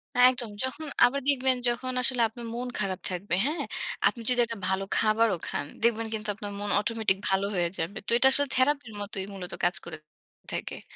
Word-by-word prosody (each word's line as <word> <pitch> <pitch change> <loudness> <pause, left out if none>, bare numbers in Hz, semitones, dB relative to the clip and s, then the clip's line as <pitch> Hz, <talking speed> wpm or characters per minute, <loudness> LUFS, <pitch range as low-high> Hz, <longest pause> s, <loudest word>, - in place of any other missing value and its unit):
হ্যাঁ, 250 0 +8
একদম। 240 -3 -4
যখন 285 +4 -3 0.2
আবার 280 +3 0
দেখবেন 260 -2 +3
যখন 255 +2 -2
আসলে 250 -1 +2
আপনার 235 +1 -9
মন 250 +1 -3
খারাপ 190 -2 -1
থাকবে, 180 0 -2
হ্যাঁ? 310 +4 -1 0.4
আপনি 235 - -2
যদি 245 -1 +2
একটা 230 -1 -6
ভালো 190 +1 0
খাবারও 215 -3 +3
খান, 145 - -2 0.2
দেখবেন 230 -1 +2
কিন্তু 215 0 -4
আপনার 205 -1 -6
মন 205 0 -3
অটোমেটিক 210 -2 +1
ভালো 195 +1 +2
হয়ে 175 -1 +1
যাবে। 180 +6 -3
তো - - -1
এটা 265 - +6
আসলে 285 +1 +3
থেরাপির 255 -3 +2
মতোই 195 -1 -4
মূলত 180 -2 -6
কাজ 175 +2 +3
করে 170 -2 -7 0.5
থাকে। - - -4
225 Hz, 190 wpm, -28 LUFS, 195-250 Hz, 0.5 s, হ্যাঁ